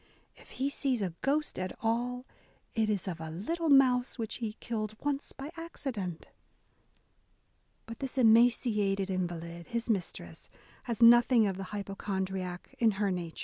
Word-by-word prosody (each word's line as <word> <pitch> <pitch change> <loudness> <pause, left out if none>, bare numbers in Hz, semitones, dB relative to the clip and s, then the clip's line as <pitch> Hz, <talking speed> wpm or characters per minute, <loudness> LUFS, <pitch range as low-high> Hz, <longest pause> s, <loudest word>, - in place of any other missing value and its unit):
If - - -18
he 275 +2 0
sees 260 -6 0
a 180 -3 -2
ghost 295 -2 0
at 185 0 -3
all, 245 +3 -1 0.5
it 220 -2 +1
is 200 -3 -1
of 170 -3 -4
a 160 - -5
little 320 - -2
mouse 255 -3 +4
which 225 -3 -3
he 225 -3 -3
killed 215 -2 -4
oooe 285 +2 -3
by 275 +3 -6
accident! 250 - -5 0.8
" - - -42
But 230 0 -9
this 270 -1 -5
emaciated 220 -5 +4
invalid, 170 -2 -4
his 235 -1 -1
mistress, 165 - -4 0.4
has 235 -1 0
nothing 240 0 +7
of 195 -2 0
the 195 0 -5
hypochondriac 190 -3 -4
in 225 -3 +4
her 200 0 0
nature. 175 -3 -4
220 Hz, 150 wpm, -31 LUFS, 190-250 Hz, 0.8 s, nothing